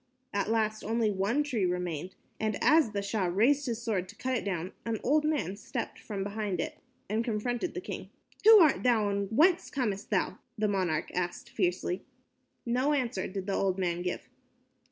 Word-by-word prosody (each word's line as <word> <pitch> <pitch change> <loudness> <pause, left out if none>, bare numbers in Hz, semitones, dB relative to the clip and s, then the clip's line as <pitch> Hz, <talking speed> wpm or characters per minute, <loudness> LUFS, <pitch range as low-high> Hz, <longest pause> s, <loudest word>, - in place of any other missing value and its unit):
At 200 +1 0
last 215 -1 0
only 225 0 +1
one 205 +9 +1
tree 250 -9 -1
remained, 180 -1 -2 0.2
and 215 -1 0
as 310 -5 +5
the 200 -1 -3
Shah 200 -1 0
raised 245 +11 +3
his 235 -1 -3
sword 195 -6 -1
to 225 - -11
cut 260 +3 -1
it 235 - -1
down, 185 -2 -3
an 225 -2 -2
old 300 +4 +3
man 290 - 0
stepped 230 +3 -5
from 200 -3 -4
behind 205 -2 -3
it - - -3 0.3
and 220 +3 0
confronted 240 +7 -2
the 370 - -3
king. 400 - -6 0.3
"Who 445 +1 +10
art 310 -4 +5
thou, 225 -5 +3
and 200 0 -1
whence 330 - +4
camest 210 -7 -2
thou?" - - 0 0.2
the 215 0 +1
monarch 185 -6 0
asked 175 -1 -3
fiercely. 180 -1 -1 0.6
No 255 +5 +2
answer 240 -9 -1
did 190 0 -5
the 200 - -2
old 190 -1 +1
man 175 -2 -1
make. 180 0 -2
215 Hz, 185 wpm, -30 LUFS, 190-245 Hz, 0.6 s, Who